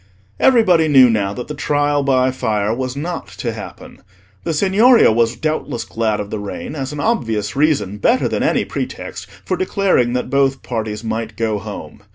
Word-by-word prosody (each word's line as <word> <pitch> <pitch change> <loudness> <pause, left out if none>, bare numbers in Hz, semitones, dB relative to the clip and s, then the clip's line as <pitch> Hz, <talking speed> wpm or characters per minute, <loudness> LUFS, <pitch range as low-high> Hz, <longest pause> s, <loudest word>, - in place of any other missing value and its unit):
Everybody 185 -11 +4
knew 130 -5 +6
now 100 -3 0
that 125 - -6
the 150 - -5
Trial 145 0 0
by 130 -2 +2
Fire 110 -4 -1
was 130 +1 -3
not 165 +4 -4
to - - -3
happen. - - -10 0.4
The - - 0
Signoria 205 - +5
was 115 +1 +1
doubtless 155 -3 -2
glad 110 -2 -1
of 105 0 -5
the 110 - -3
rain, 105 +7 -6
as 135 -2 -4
an 150 - -6
obvious 115 - -1
reason, 135 -9 +1
better 245 - +2
than - - -2
any - - +1
pretext, - - -6 0.2
for 185 - 0
declaring 185 -9 +1
that 125 - -2
both 135 -1 +1
parties 110 -2 -4
might 110 -1 -4
go 110 -2 -1
home. 105 +1 -9
130 Hz, 180 wpm, -18 LUFS, 110-155 Hz, 0.4 s, knew